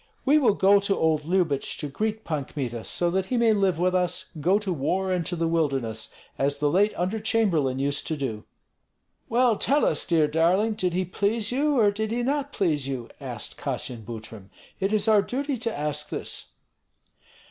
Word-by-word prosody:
We 290 +3 +5
will 240 -8 +3
go 200 +1 +5
to 200 0 0
old 155 -2 +1
Lyubich 170 -5 0
to 150 - -4
greet 215 +9 -3
Pan 150 -4 -2
Kmita, 120 -6 -4
so 175 -1 0
that 190 +1 0
he 250 - 0
may 230 -2 +4
live 195 -5 +2
with 180 +2 +1
us, 180 -1 -1
go 185 +6 +4
to 205 -3 -2
war 185 +6 -1
and 180 -2 0
to 180 - -2
the 165 -1 0
wilderness, 135 -9 -1 0.3
as 140 +1 +1
the 145 0 +1
late 200 +5 +3
under 185 +5 -1
chamberlain 190 - +1
used 140 +1 -1
to 160 - -2
do." 115 -7 -4 0.9
"Well, 235 -1 +3
tell 285 +7 +2
us, 155 - +1
dear 160 -3 +3
darling, 175 +8 +2
did 185 -5 -1
he 185 0 0
please 205 +4 -1
you 285 +2 +1
or 210 -3 +5
did 215 +1 -3
he 240 +2 -1
not 285 +2 -1
please 150 -8 0
you?" 130 -4 -4
asked - - -6
Kassyan 120 -3 -4
Butrym. 110 -3 -9 0.3
"It 195 +1 0
is 215 0 +1
our 215 -2 +6
duty 275 +6 -2
to 230 - -3
ask 150 0 -2
this." - - -5
180 Hz, 195 wpm, -25 LUFS, 145-215 Hz, 0.9 s, our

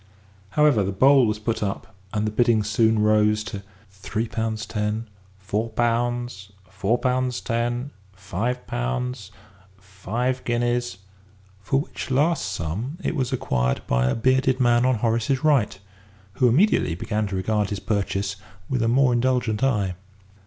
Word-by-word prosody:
However, 150 -8 +5
the 95 - -1
bowl 130 +5 +5
was 105 0 -1
put 110 +1 -2
up, 100 -2 -4 0.2
and 105 0 -1
the 105 - -1
bidding 115 -1 +3
soon 110 +1 +2
rose 105 0 +3
to 100 -2 -6 0.3
three 105 +4 -4
pounds 110 0 -3
ten, 105 +1 -2 0.3
four 105 +4 -2
pounds, 120 -3 -1 0.2
four 100 +5 0
pounds 125 0 0
ten, 120 +3 -2 0.2
five 100 +7 -3
pounds, 95 - -3 0.5
five 105 +7 -3
guineas, 120 -3 -1 0.6
for 135 +8 0
which - - -7
last 150 +4 +1
sum 105 - -4
it - - -1
was 130 -5 -1
acquired 60 0 -1
by 60 0 +1
a - - 0
bearded 130 +2 +2
man 120 0 +4
on 130 - +3
Horace's 115 +4 0
right, 140 -11 +2 0.6
who 125 +5 +3
immediately 140 - +3
began 105 +4 -2
to 100 - -4
regard 105 +2 0
his 100 - -3
purchase 100 -1 -2 0.3
with 130 -3 -1
a 115 - +2
more 125 +1 +4
indulgent 120 -2 +1
eye. 105 -8 +1
115 Hz, 145 wpm, -24 LUFS, 100-125 Hz, 0.6 s, However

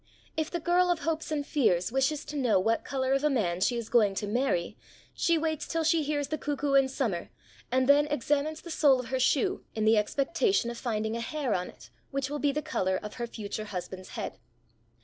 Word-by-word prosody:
If 315 0 -1
the 345 - -3
girl 355 +2 +3
of 345 -3 +1
hopes 320 -1 -2
and 290 -2 -1
fears 220 - +1
wishes 270 +3 0
to 300 - -7
know 250 -8 +3
what 225 +4 +1
colour 265 -1 -1
of 275 +1 +1
a 300 - +4
man 185 -10 0
she 240 - +2
is 235 -2 -3
going 215 -5 +3
to 205 - -2
marry, 210 -5 0 0.4
she 335 -1 +2
waits 315 -1 -2
till 330 0 -1
she 320 +1 +3
hears 290 -1 -1
the 310 - -2
cuckoo 290 -1 -1
in 270 -1 +5
summer, 225 -11 -2 0.4
and 255 0 +2
then 290 +1 +5
examines 295 +2 -1
the 340 - -9
sole 285 -4 +4
of 250 - -6
her 260 0 0
shoe 260 +1 +2
in 220 -1 0
the 220 0 +5
expectation 275 - +1
of 235 - -8
finding 220 -2 -2
a 235 - -3
hair 275 -1 -2
on 180 0 -2
it - - -15 0.2
which 275 0 -2
will 295 - -2
be 290 -1 +2
the 300 +2 -3
colour 190 -5 0
of 210 - -6
her 235 - -1
future 215 -1 -5
husband's 185 -1 -6
head. - - -5
270 Hz, 225 wpm, -29 LUFS, 220-300 Hz, 0.4 s, in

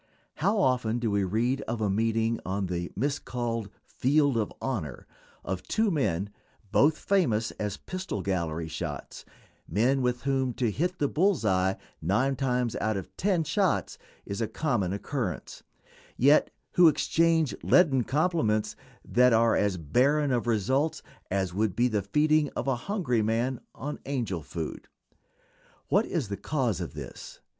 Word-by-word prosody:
How 200 +8 +1
often 125 - +2
do 120 -3 -1
we 100 -1 +1
read 115 +8 0
of 115 0 -2
a 105 - +1
meeting 115 +3 +1
on 95 +1 -2
the 90 -1 -3
miscalled 120 -4 -2 0.2
"field 145 0 +2
of 110 -2 0
honor" 105 - -4 0.4
of 95 0 -3
two 220 -1 0
men, 100 - 0 0.4
both 150 +7 +4
famous 120 - +1
as 105 -2 -2
pistol 185 - -5
gallery 85 -4 -2
shots; 80 - -6 0.4
men 125 - +2
with 125 -1 -1
whom 135 -2 0
to 120 -3 0
hit 175 - -1
the 145 - +1
"bull's 175 - +1
eye" 95 -1 +2 0.2
nine 125 - +1
times 125 -3 0
out 110 -1 0
of 95 - -8
ten 185 -3 +1
shots 175 +4 0 0.3
is 100 +3 -4
a 115 - 0
common 120 - -1
occurrence, 105 0 -4 0.6
yet 140 +4 +5 0.2
who 175 -1 +6
exchange 160 -1 +2
leaden 140 -8 +4
compliments 145 -7 +1 0.3
that 125 0 +4
are 115 0 +4
as 100 -3 +1
barren 135 - +2
of 120 -1 0
results 130 +8 +1 0.3
as 95 -2 -1
would 105 -1 0
be 120 +1 +3
the 105 -4 0
feeding 150 +8 +2
of - - -3
a 135 - +2
hungry 165 - +1
man 115 +4 0
on 145 +2 -5
"angel 115 - -2
food." 80 0 -6 1.0
What - - +3
is 110 - -2
the 100 - -3
cause 125 - -1
of 85 - -6
this? - - -9
120 Hz, 150 wpm, -28 LUFS, 100-145 Hz, 1.0 s, who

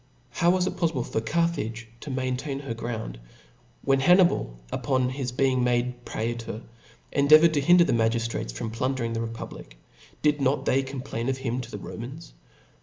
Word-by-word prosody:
How 170 +7 +2
was 180 0 +3
it - - -3
pofTible 160 -8 0
for 110 - -2
Carthage 120 -5 -1
to 150 - -8
maintain 130 +2 -2
her 140 -5 -4
ground? 110 - -5 0.6
When 135 -1 +3
Hannibal, 175 - +4
upon 130 -3 +1
his 130 -1 -3
beihg 130 0 +2
I - - +1
made 125 0 0
prsetor, 115 -1 -4 0.5
endeavoured 155 +3 +6
to 145 - +2
hinder 175 +4 +6
the - - +1
magiftrates 115 - 0
I - - -14
from 110 - -4
plundering 120 0 -1
the 115 - -2
republic, 115 - -7 0.5
did 150 -1 +3
not 135 +2 +1
they 135 - +3
com 135 -1 -6
I 135 - -12
plain 115 +3 -2
of 135 - 0
him 130 -1 -2
to 120 - -9
the 105 - -6
Romans? 135 - -8
130 Hz, 180 wpm, -26 LUFS, 115-140 Hz, 0.6 s, endeavoured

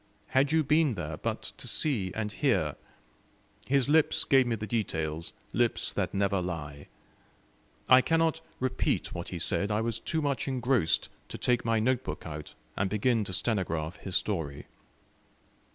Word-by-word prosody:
Had 135 +2 +3
you 160 0 +3
been 150 -1 +3
there 80 -6 -4
but - - -3
to - - -5
see 110 -12 +1
and 105 -1 -2
hear! - - +1 0.9
His 135 -1 +2
lips 155 +1 +4
gave 135 -4 +4
me 115 - +1
the 105 -1 -5
details; 80 -8 -2 0.2
lips - - +1
that - - -1
never 100 -1 +1
lie. 75 -5 -5 1.0
I 130 0 +8
cannot 165 +2 +1 0.2
repeat 130 0 0
what 85 0 -5
he 90 - -4
said; 85 +4 0
I 105 +1 +1
was 115 -1 -1
too 160 - -2
much 140 -2 -1
engrossed 125 -9 +1 0.2
to - - -5
take 125 -1 +1
my 115 -1 +2
note 125 +3 +1
book - - -6
out, 75 -2 -7 0.2
and 95 0 0
begin 110 +2 +2
to 95 - -5
stenograph 90 -6 -1
his 95 -2 0
story. 75 -8 -2
110 Hz, 160 wpm, -29 LUFS, 90-130 Hz, 1.0 s, I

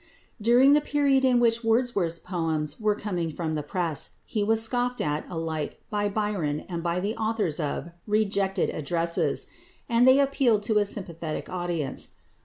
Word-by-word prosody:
During 245 +5 +6
the 295 - +5
period 280 -2 +2
in 255 -2 +4
which 230 0 +2
Wordsworth's 225 -7 +1
poems 160 -4 -2
were 215 -1 +1
coming 180 -6 -3
from 160 0 -3
the 155 - -1
press 160 0 -2
he 215 -3 -1
was 220 +2 +2
scoffed 245 +2 +1
at 150 0 -2
alike 160 -3 -4
by 205 -1 0
Byron 200 -8 -1
and 170 -2 -4
by 170 +1 -1
the 205 +5 -2
authors 215 -8 -1
of 150 +1 -3 0.2
"Rejected 200 -3 +1
Addresses," 170 +2 0 0.4
and 235 +1 +4
they 260 +2 +7
appealed 270 -6 +2
to 215 0 +2
a 205 - +2
sympathetic 170 -6 -5
audience. 175 -6 -3
200 Hz, 160 wpm, -26 LUFS, 165-230 Hz, 0.4 s, they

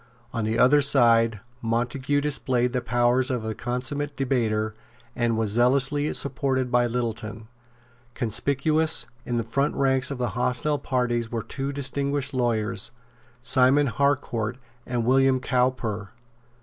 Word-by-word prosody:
On 115 -3 -1
the 110 +1 0
other 140 +4 +5
side 115 -6 +4 0.2
Montague 125 +5 0
displayed 130 -4 0
the 125 - 0
powers 120 +2 +2
of 125 -4 -2
a 110 - -2
consummate 140 +5 -4
debater, 110 -5 0 0.4
and 120 -2 0
was 110 -2 0
zealously 135 +5 +2
supported 130 -2 -1
by 120 0 +3
Littleton. 115 -2 -4 0.7
Conspicuous 140 +7 +1 0.2
in 120 - -1
the 115 - 0
front 140 +6 -1
ranks 130 -1 +2
of 140 - -4
the 125 -1 -1
hostile 125 +5 -1
parties 120 -4 -1
were 115 -2 -3
two 135 +1 -4
distinguished 140 0 -1
lawyers, 115 -5 0 0.5
Simon 135 +2 +4
Harcourt 130 -4 0 0.3
and 120 -2 -1
William 135 +1 +4
Cowper. 125 -5 -1
125 Hz, 130 wpm, -25 LUFS, 115-140 Hz, 0.7 s, other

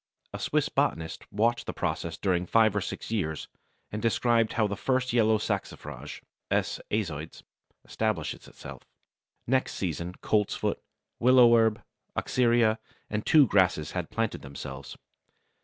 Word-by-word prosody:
A - - -5
Swiss - - +1
botanist 80 0 -2
watched 115 +3 +1
the - - -3
process 85 -1 -2
during 90 -2 0
five 110 -1 +4
or 105 - +1
six 95 - -6
years, 80 -8 -2 0.4
and 105 - -4
describes 115 0 +2
how 110 -3 +3
first 125 +5 0
the 120 - +1
yellow 110 -1 +4
Saxifrage 100 -2 -5 0.3
(S. - - 0
aizoides) 80 -7 -3 0.4
establishes 110 -8 -2
itself. - - -10 0.6
Next 130 +2 +1
season 85 -1 -3
Coltsfoot, 105 +1 0 0.4
willow 125 -1 +7
herb, 110 -2 +2 0.3
Oxyria, 115 -3 +2 0.3
and 105 0 -1
two 150 -3 +7
grasses 90 -8 +2
had 90 -3 -3
planted 115 -2 -2
themselves. 70 0 -8
105 Hz, 130 wpm, -28 LUFS, 90-115 Hz, 0.6 s, willow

